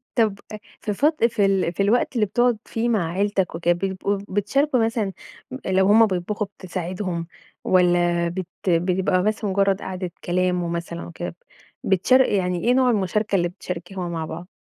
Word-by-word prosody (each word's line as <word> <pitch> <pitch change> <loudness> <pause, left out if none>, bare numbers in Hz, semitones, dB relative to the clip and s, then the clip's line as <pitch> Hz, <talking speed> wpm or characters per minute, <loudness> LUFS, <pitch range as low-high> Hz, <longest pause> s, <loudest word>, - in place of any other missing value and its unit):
طب 215 -4 +2
أ - - -4 0.2
في 210 - -2
فت 300 +6 +1
في 220 -3 +2
ال 195 -3 +1
في 200 - 0
الوقت 235 +6 +1
اللي 220 -3 +3
بتُقعد 240 +3 +2
فيه 230 +1 -1
مع 185 -8 0
عيلتك 195 -1 0
وكده، 170 +1 +2
بتبقوا 195 +2 -2
بتشاركوا 230 +6 +1
مثلًا 225 -4 -1 0.4
م 260 - -4
لو 190 0 +3
همُ 220 +3 +7
بيطبُخوا 205 +2 -2
بتساعدهم، 180 -1 -4 0.4
والّا 175 -1 +3
بت 185 +1 -5
بيبقى 180 +1 +2
بس 215 +2 -1
مُجرَّد 195 -1 +1
قعدة 185 -1 -5
كلام 180 0 0
ومثلًا 170 0 -4
وكده، 170 0 -6 0.5
بتشار 195 +8 +4
يعني 180 -7 0
إيه 245 - +4
نوع 255 0 +4
المُشاركة 210 -1 0
اللي 175 -2 +2
بتشاركها 180 +1 -6
مع 165 -2 -3
بعض؟ 170 +3 -7
190 Hz, 165 wpm, -23 LUFS, 175-210 Hz, 0.5 s, همُ